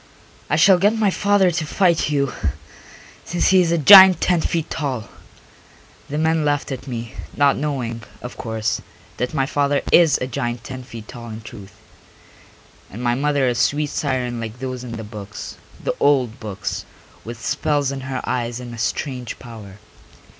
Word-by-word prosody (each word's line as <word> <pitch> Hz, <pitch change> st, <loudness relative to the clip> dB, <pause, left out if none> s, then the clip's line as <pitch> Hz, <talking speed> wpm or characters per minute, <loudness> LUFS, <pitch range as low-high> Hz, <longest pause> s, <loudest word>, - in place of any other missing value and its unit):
"I 150 Hz, -, +2 dB
shall 185 Hz, +3 st, +6 dB
get 205 Hz, +4 st, +3 dB
my 210 Hz, -3 st, +2 dB
father 200 Hz, -2 st, +3 dB
to 170 Hz, -1 st, -2 dB
fight 170 Hz, -3 st, +2 dB
you, 140 Hz, -3 st, 0 dB, 0.9 s
since 175 Hz, +1 st, 0 dB
he 190 Hz, -1 st, +6 dB
is 170 Hz, -2 st, +1 dB
a 170 Hz, -, +2 dB
giant 190 Hz, +2 st, +9 dB
ten 175 Hz, -2 st, +2 dB
feet 165 Hz, -1 st, -1 dB
tall." 130 Hz, -7 st, -3 dB, 1.0 s
The 145 Hz, -, -3 dB
men 160 Hz, 0 st, +1 dB
laughed 145 Hz, -1 st, 0 dB
at 130 Hz, +1 st, -6 dB
me, 115 Hz, -3 st, -5 dB, 0.2 s
not 140 Hz, -1 st, +4 dB
knowing, 125 Hz, -6 st, -3 dB, 0.2 s
of 125 Hz, -, -7 dB
course, 110 Hz, 0 st, -2 dB, 0.4 s
that 125 Hz, +4 st, -3 dB
my 135 Hz, -2 st, +2 dB
father 145 Hz, 0 st, 0 dB
is 165 Hz, -4 st, +6 dB
a -, -, -3 dB
giant 120 Hz, -2 st, -4 dB
ten 130 Hz, +1 st, -7 dB
feet 115 Hz, -3 st, -10 dB
tall 120 Hz, -2 st, -9 dB
in 110 Hz, 0 st, -7 dB
truth, 105 Hz, -4 st, -12 dB, 1.1 s
and 115 Hz, +5 st, -8 dB
my 120 Hz, -1 st, +2 dB
mother 140 Hz, +1 st, +1 dB
a 125 Hz, -, +2 dB
sweet 140 Hz, +6 st, 0 dB
siren 125 Hz, -4 st, -2 dB
like 115 Hz, 0 st, -6 dB
those 130 Hz, -1 st, -5 dB
in 120 Hz, -2 st, -7 dB
the 110 Hz, -1 st, -6 dB
books, 105 Hz, -1 st, -8 dB, 0.3 s
the -, -, 0 dB
old 130 Hz, -5 st, +2 dB
books, 105 Hz, -4 st, -5 dB, 0.4 s
with 115 Hz, 0 st, -8 dB
spells 145 Hz, +1 st, 0 dB
in 135 Hz, -1 st, -5 dB
her 130 Hz, -1 st, -4 dB
eyes 120 Hz, -1 st, -2 dB
and 120 Hz, -1 st, -8 dB
a 115 Hz, -, -8 dB
strange 125 Hz, +1 st, -3 dB
power. 110 Hz, -6 st, -11 dB
130 Hz, 175 wpm, -21 LUFS, 120-150 Hz, 1.1 s, giant